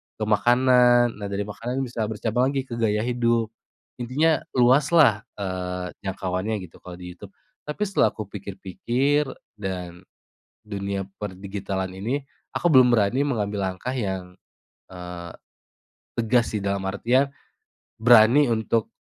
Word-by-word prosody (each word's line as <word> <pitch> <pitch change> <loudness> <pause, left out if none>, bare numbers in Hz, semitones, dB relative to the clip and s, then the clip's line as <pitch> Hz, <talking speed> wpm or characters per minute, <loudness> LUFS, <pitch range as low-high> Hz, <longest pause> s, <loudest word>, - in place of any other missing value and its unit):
ke 110 - -4
makanan. 120 +2 +4
Nah, 100 - -4
dari 100 +1 -2
makanan 115 +6 -4
bisa 115 -4 -3
bercabang 110 +3 0
lagi 135 -1 -1
ke 120 -3 -7
gaya 105 -1 +1
hidup, 120 -2 +1 0.5
intinya 145 +6 +2 0.2
luaslah, 130 -2 +4
eee, 90 -2 -4
jangkauannya 95 +2 -3
gitu 85 - -13
kalau 90 -1 -10
di 90 0 -9
YouTube. 95 +2 -13 0.3
Tapi 150 +7 -6
setelah 200 -2 +2
aku 110 - -4
pikir-pikir 120 +9 -1 0.3
dan 90 -3 -5 0.7
dunia 100 -1 -3
per 105 -2 -5
digitalan 95 0 -4
ini, 120 +9 -2 0.4
aku 175 - +2
belum 130 -2 +7
berani 110 +4 +2
mengambil 105 -7 -1
langkah 120 +8 -5
yang, 95 -5 -4 0.5
eee, 90 -2 -8 0.9
tegas 115 +1 +2
sih 105 - -1
dalam 100 0 -1
artian 120 +8 +2 0.7
berani 120 +4 +6
untuk 110 0 0
110 Hz, 130 wpm, -24 LUFS, 95-125 Hz, 0.9 s, belum